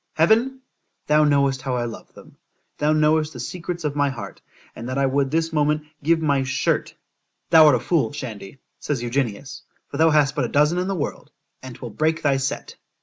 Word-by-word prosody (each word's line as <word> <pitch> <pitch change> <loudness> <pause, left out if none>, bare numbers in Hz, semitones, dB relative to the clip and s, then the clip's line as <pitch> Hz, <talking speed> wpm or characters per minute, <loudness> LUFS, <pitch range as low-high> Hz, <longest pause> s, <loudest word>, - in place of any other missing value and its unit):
——Heaven! 230 +11 +2 0.4
thou 150 0 +4
knowest 140 -3 +2
how 130 -1 -2
I 120 -1 -1
love 115 - -9
them;——thou 150 +1 -6
knowest 155 0 +2
the 125 - -9
secrets 175 +6 -5
of 145 -2 -2
my 145 -1 +2
heart, 130 -3 -8 0.3
and 120 +2 -7
that 130 - -3
I 140 - +2
would 135 0 +1
this 165 +2 -1
moment 150 0 +1 0.2
give 165 +3 +2
my 145 -4 +1
shirt——Thou 135 +4 0
art 145 - +6
a - - 0
fool, 165 +5 0
Shandy, 115 -5 -8 0.2
says 135 -5 -3
Eugenius, 120 +1 -3 0.3
for 140 - -6
thou 160 +1 +5
hast 150 -3 +3
but - - 0
a - - -4
dozen 150 +5 +2
in 180 - -2
the 195 - -1
world,—and 130 -4 -8
'twill 120 - -8
break 160 +6 0
thy 140 -2 +2
set. 135 0 -4
145 Hz, 190 wpm, -22 LUFS, 135-160 Hz, 0.4 s, art